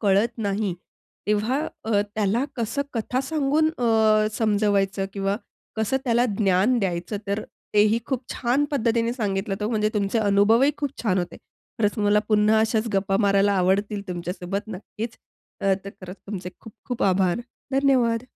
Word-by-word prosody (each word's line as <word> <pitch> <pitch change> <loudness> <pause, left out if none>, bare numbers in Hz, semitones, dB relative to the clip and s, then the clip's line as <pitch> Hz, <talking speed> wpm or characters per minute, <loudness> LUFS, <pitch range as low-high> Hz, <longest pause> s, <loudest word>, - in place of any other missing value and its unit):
कळत 205 +3 +3
नाही, 200 -2 -1 0.5
तेव्हा 210 +6 +1 0.3
अ, 215 -2 +2
त्याला 215 +4 +1
कसं 235 +4 -1
कथा 245 +2 -1
सांगून 310 +1 +2
अ, 220 -2 +3
समजवायचं 205 -3 +1
किंवा 195 0 -1 0.4
कसं 220 +4 +1
त्याला 240 -1 +3
ज्ञान 205 +4 +3
द्यायचं. 185 +1 -2
तर 200 +2 -1 0.3
तेही 210 +2 +4
खूप 265 -2 -2
छान 255 +4 +1
पद्धतीने 235 -4 +1
सांगितलं, 200 -4 -2
हो. 210 - -1
म्हणजे 215 -2 +1
तुमचे 205 +2 +1
अनुभवही 215 +6 +4
खूप 285 -2 -2
छान 190 -5 +1
होते. 175 -1 -3 0.4
खरंच 210 0 +1
मला 205 0 +3
पुन्हा 215 0 +4
अशाच 220 +1 +1
गप्पा 195 0 +1
मारायला 200 -1 +3
आवडतील 200 +2 +1
तुमच्यासोबत 180 +3 -4
नक्कीच. 215 +4 -7 0.5
तर 195 0 0
खरंच 185 0 -8
तुमचे 185 -3 -5
खूप-खूप 225 +2 -7
आभार. 185 +1 +2 0.3
धन्यवाद. 255 -4 +3
210 Hz, 140 wpm, -24 LUFS, 195-230 Hz, 0.5 s, तेही